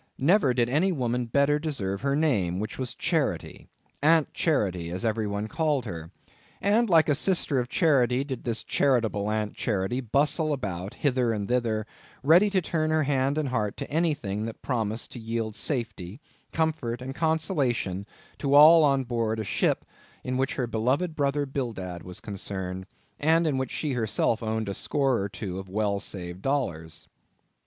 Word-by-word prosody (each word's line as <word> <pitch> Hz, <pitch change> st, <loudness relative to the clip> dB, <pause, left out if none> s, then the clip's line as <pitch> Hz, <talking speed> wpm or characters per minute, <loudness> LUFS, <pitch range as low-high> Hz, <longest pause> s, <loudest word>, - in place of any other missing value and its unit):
Never 155 Hz, 0 st, +4 dB
did 120 Hz, -1 st, +1 dB
any 155 Hz, +10 st, +2 dB
woman 125 Hz, -5 st, -1 dB
better 140 Hz, +4 st, +2 dB
deserve 100 Hz, -11 st, -2 dB
her 140 Hz, +1 st, +1 dB
name, 100 Hz, -, +1 dB
which 110 Hz, +4 st, -5 dB
was 130 Hz, -2 st, -4 dB
Charity—Aunt 160 Hz, +1 st, -1 dB
Charity, 95 Hz, -, 0 dB
as 90 Hz, +5 st, -4 dB
everybody 105 Hz, -2 st, -1 dB
called 150 Hz, -1 st, 0 dB
her. 80 Hz, -5 st, -6 dB, 0.5 s
And 220 Hz, +3 st, +2 dB
like 165 Hz, -3 st, +5 dB
a 150 Hz, -, +4 dB
sister 155 Hz, -3 st, +1 dB
of 120 Hz, 0 st, -3 dB
charity 135 Hz, -5 st, +3 dB
did 135 Hz, -4 st, -6 dB
this 115 Hz, -2 st, -2 dB
charitable 115 Hz, -7 st, +1 dB
Aunt 105 Hz, -1 st, -1 dB
Charity 110 Hz, +4 st, -1 dB
bustle 145 Hz, +5 st, +1 dB
about 100 Hz, -7 st, -4 dB
hither 130 Hz, -4 st, +1 dB
and 105 Hz, -3 st, -2 dB
thither, 115 Hz, -3 st, 0 dB, 0.4 s
ready 175 Hz, +8 st, +6 dB
to 190 Hz, -3 st, +1 dB
turn 155 Hz, -1 st, 0 dB
her 155 Hz, 0 st, +2 dB
hand 140 Hz, 0 st, +1 dB
and 150 Hz, -3 st, 0 dB
heart 105 Hz, -5 st, -1 dB
to -, -, -6 dB
anything 145 Hz, -, 0 dB
that 115 Hz, -, -8 dB
promised 115 Hz, -3 st, -2 dB
to 125 Hz, -, -8 dB
yield 115 Hz, -1 st, -3 dB
safety, 115 Hz, -, -3 dB, 0.3 s
comfort, 155 Hz, -7 st, -1 dB
and 130 Hz, +1 st, -6 dB
consolation 140 Hz, -, 0 dB, 0.3 s
to 140 Hz, -1 st, +1 dB
all 155 Hz, +3 st, +9 dB
on 140 Hz, -2 st, +3 dB
board 115 Hz, -3 st, -1 dB
a -, -, -1 dB
ship 100 Hz, -, 0 dB, 0.4 s
in 130 Hz, -, -2 dB
which 135 Hz, +1 st, 0 dB
her 125 Hz, -, -1 dB
beloved 130 Hz, +9 st, 0 dB
brother 145 Hz, 0 st, 0 dB
Bildad 110 Hz, -11 st, -4 dB
was 90 Hz, 0 st, -8 dB
concerned, 95 Hz, -2 st, -5 dB, 0.3 s
and 165 Hz, +3 st, +3 dB
in 150 Hz, -4 st, +1 dB
which 130 Hz, -2 st, -2 dB
she 150 Hz, -3 st, -2 dB
herself 110 Hz, -1 st, 0 dB
owned 110 Hz, -1 st, -2 dB
a 100 Hz, -, -2 dB
score 135 Hz, +2 st, 0 dB
or 100 Hz, +1 st, -2 dB
two 95 Hz, -2 st, -5 dB
of 95 Hz, -1 st, -9 dB
well 100 Hz, 0 st, 0 dB
saved 90 Hz, -2 st, -6 dB
dollars. 85 Hz, -, -2 dB
125 Hz, 165 wpm, -27 LUFS, 105-145 Hz, 0.5 s, all